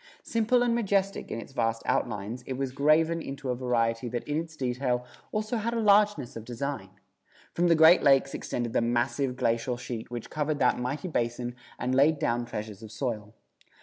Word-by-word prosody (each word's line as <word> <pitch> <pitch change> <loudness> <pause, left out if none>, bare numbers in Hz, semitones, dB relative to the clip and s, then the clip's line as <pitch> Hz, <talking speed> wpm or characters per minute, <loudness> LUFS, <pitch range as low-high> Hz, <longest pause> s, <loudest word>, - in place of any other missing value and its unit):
Simple 230 +2 +2
and 240 -1 +2
majestic 200 -4 0
in - - -3
its 135 - -10
vast 115 -2 0
outlines 110 +2 -1
it 130 - -2
was 135 -1 -2
graven 155 +4 +3
into 135 -2 -4
a - - -1
variety 120 -1 0
that 120 0 -4
in 150 +1 0
its 160 -1 -7
detail 125 -2 -1 0.3
also 215 +2 -1
had 230 +2 -2
a - - 0
largeness 205 - +3
of 115 - -6
design. 130 +4 -4 0.6
From 175 +1 +2
the 170 - +5
Great 160 +3 +7
Lakes 135 0 +4
extended 120 -2 -3
the - - +2
massive 120 +3 0
glacial 120 0 0
sheet 120 -2 -6
which 120 -1 -6
covered 150 0 -1
that 125 -3 +2
mighty 135 +8 -3
basin 120 -4 -2 0.2
and 125 - -1
laid 145 +4 +4
down 120 -2 0
treasures 105 -3 -6
of 110 -1 -10
soil. 110 -4 -4
130 Hz, 185 wpm, -28 LUFS, 120-160 Hz, 0.6 s, Great